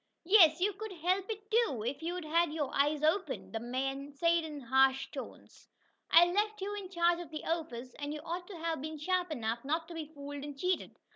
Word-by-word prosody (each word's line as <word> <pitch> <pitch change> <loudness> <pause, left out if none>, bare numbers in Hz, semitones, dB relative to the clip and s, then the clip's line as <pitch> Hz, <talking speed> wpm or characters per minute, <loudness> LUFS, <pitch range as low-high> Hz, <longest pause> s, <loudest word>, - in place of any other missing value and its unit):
"Yes, 340 -4 +7
you 400 +3 +2
could 430 +1 -7
help 365 +4 0
it 425 0 -6
too, 435 - +2
if 270 +6 -3
you'd 350 +1 -3
had 335 +1 +2
your 300 -3 -2
eyes 295 +2 +2
open!" 320 -1 0
the 225 - -3
man 270 +4 -3
said 335 +3 +2
in 305 -2 -6
harsh 265 +2 +3
tones. - - -10 0.4
"I 340 - +8
left 420 +4 0
you 395 +2 -3
in 400 -3 -6
charge 345 -1 +2
of 345 -3 -7
the 310 -1 -6
office, 260 -7 -3
and 290 0 -3
you 305 - -4
ought 350 +3 -5
to 400 - -8
have 325 -3 -2
been 310 +1 -5
sharp 360 +3 0
enough 235 -5 -2
not 320 +4 -1
to - - -7
be 320 -2 -5
fooled 285 -1 -7
and 290 -1 -7
cheated. 365 +4 -1
320 Hz, 215 wpm, -32 LUFS, 285-360 Hz, 0.4 s, I